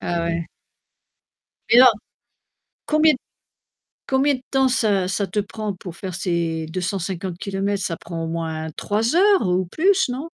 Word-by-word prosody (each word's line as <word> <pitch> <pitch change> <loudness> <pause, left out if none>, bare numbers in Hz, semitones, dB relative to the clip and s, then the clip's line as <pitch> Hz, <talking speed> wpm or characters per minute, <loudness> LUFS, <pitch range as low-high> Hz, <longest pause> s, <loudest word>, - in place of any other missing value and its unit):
Ah, 175 -1 -2
ouais. 170 0 -2 1.2
Mais - - +6
alors, 255 -3 +8 0.9
combien 310 0 +4
d - - -3 0.9
combien 275 +2 +3
de 255 - -5
temps 265 -1 +3
ça 210 -7 +1
ça 195 +1 -1
te 190 +3 -4
prend 210 +1 -4
pour 180 -1 -9
faire 185 -2 -6
ces 170 -3 -1
250 180 +1 -3
kilomètres? 200 0 -2
Ça 170 -3 -2
prend 165 -1 -6
au - - -3
moins 160 -1 -3
3 220 +6 0
heures 390 - +4
ou 180 0 +1
plus, 380 - +2
non? 250 +2 -3
195 Hz, 155 wpm, -22 LUFS, 170-250 Hz, 1.2 s, alors